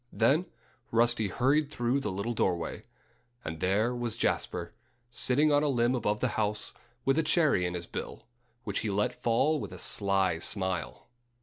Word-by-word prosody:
Then 140 +10 +2 0.4
Rusty 115 -1 +2
hurried 140 +8 +2
through 120 0 0
the 105 -7 -3
little 100 +5 -2
doorway. 90 -2 -1 0.6
And 80 0 -5
there 105 +8 +1
was 120 -2 -2
Jasper, 85 -1 -1 0.4
sitting 145 +5 +3
on 145 0 +4
a 150 - +1
limb 120 -2 +2
above 105 -4 -1
the 130 - +2
house, 105 0 0 0.3
with 135 +3 +3
a - - +5
cherry 150 - +3
in 90 - -4
his 85 -1 -5
bill, - - -7 0.4
which 100 -4 -2
he 110 - -2
let 100 +1 0
fall 125 +6 +1
with - - -6
a - - -8
sly 95 -4 +1
smile. 95 -1 -2
115 Hz, 170 wpm, -29 LUFS, 95-130 Hz, 0.6 s, a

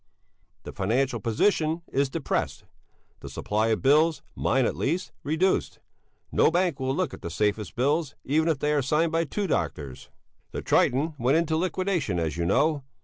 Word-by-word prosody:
The - - -7
financial 120 +5 0
position 155 - +1
is 140 0 +2
depressed. 155 +1 -2 0.6
The - - -9
supply 110 +2 -1
of 110 +1 0
bills, 155 +4 +4
mine 130 -2 +1
at - - -1
least, 170 +6 -1
reduced; 160 +6 0 0.5
no - - +4
bank 175 -3 0
will 130 0 -1
look 180 -6 -1
at - - -9
the - - -5
safest 105 +4 -1
bills, 145 +3 0
even 155 +4 +1
if 160 -3 +2
they 150 +2 0
are 145 - +2
signed 155 +5 +1
by 165 0 +1
two 200 +8 -2
doctors. 70 - -3 0.4
The - - -4
"Triton" 145 +6 +2
went 130 +6 +3
into 165 -1 +1
liquidation, 175 - -1
as 80 -2 -1
you 85 0 -1
know. 140 - +2
145 Hz, 170 wpm, -26 LUFS, 120-165 Hz, 0.6 s, bills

